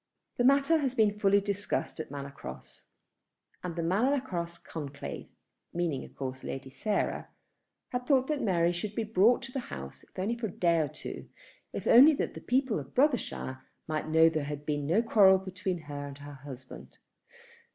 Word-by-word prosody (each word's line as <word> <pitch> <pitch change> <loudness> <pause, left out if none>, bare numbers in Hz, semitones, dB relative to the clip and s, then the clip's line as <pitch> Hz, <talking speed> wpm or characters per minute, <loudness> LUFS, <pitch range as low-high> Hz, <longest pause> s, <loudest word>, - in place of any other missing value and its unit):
The 245 - +2
matter 275 +5 +5
had 265 -3 -1
been 210 -2 +3
fully 200 0 +5
discussed 200 -3 -2
at 155 - -5
Manor 140 0 -6
Cross; 65 - -10 0.8
and 175 -2 -4
the 170 - -2
Manor 230 +12 +2
Cross 170 -9 -4
conclave, 145 -3 -7 0.5
meaning 165 -6 -1
of - - -13
course 130 -1 -5
Lady 135 0 -6
Sarah, 210 +8 -1 0.6
had 250 0 -3
thought 265 -3 +4
that 300 0 -1
Mary 175 -5 +2
should 200 +4 -4
be 225 - 0
brought 220 +4 +4
to 260 - -7
the 265 - -2
house, 70 0 -7
if - - -23
only 200 +6 0
for 235 -1 -3
a - - -7
day 170 -2 +2
or 155 - +1
two, - - -8 0.4
if - - -5
only 275 +7 +8
that - - -4
people 255 - +2
in 140 - -6
Brothershire 245 - 0 0.3
might 155 0 -2
know 160 +1 +5
that 165 0 +6
there 155 -2 0
had 145 0 -5
been 145 -1 -1
no 195 +9 +3
quarrel 200 -4 +6
between 185 -1 -3
her 145 -1 -6
and 140 -1 -9
her 145 0 -10
husband. 130 -2 -11
180 Hz, 185 wpm, -30 LUFS, 145-230 Hz, 0.8 s, only